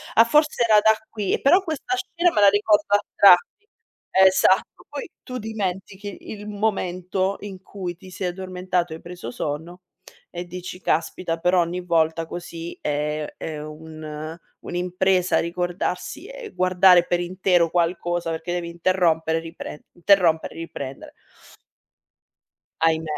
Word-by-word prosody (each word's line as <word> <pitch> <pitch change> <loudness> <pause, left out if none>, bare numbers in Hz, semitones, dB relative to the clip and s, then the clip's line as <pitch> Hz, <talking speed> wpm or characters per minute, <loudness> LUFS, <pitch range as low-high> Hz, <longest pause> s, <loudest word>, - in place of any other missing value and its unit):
Ah 230 - +7
forse 300 +1 +3
era 215 -2 +6
da 220 0 +6 0.2
qui. 205 -3 -2
Eh - - 0
però 360 +8 +5
questa 345 +2 -3
scena 350 -2 0
me 210 - +2
la 200 - +8
ricordo 205 +1 +3
a - - +4 0.2
tratti". 200 - +5 0.5
Esatto, 190 0 +5
ma - - -19
poi 290 - -6
tu 255 0 -6
dimentichi 200 -2 -5
il 210 -1 -8
momento 190 -2 -1
in 195 -2 -8
cui 180 -4 -6
ti 185 0 -13
sei 185 0 -3
addormentato 180 -2 -2
e 160 - -6
hai - - -18
preso 175 -9 -8
sonno 160 +7 -5 0.5
e 175 0 -6
dici: 180 +1 -8
"Caspita 165 +1 -1
però 180 +1 +3
ogni 175 +2 -2
volta 165 -1 +1
così 170 0 -7
è 150 +1 -2
è 155 -2 -5
un 155 +1 -8 0.3
un'impresa 180 +1 +1
ricordarsi 180 - -3
e - - -8
guardare 185 -1 +5
per 175 0 0
intero 180 -1 +2
qualcosa". 175 0 0
Perché 160 +2 -4
devi 175 -1 -3
interrompere 170 -2 +1
e - - -8
riprende, 165 -2 -9
interrompere 175 -3 +3
e - - -11
riprendere. 140 -5 -7 1.7
Ahimè. 160 -1 +1
180 Hz, 145 wpm, -23 LUFS, 165-195 Hz, 1.7 s, la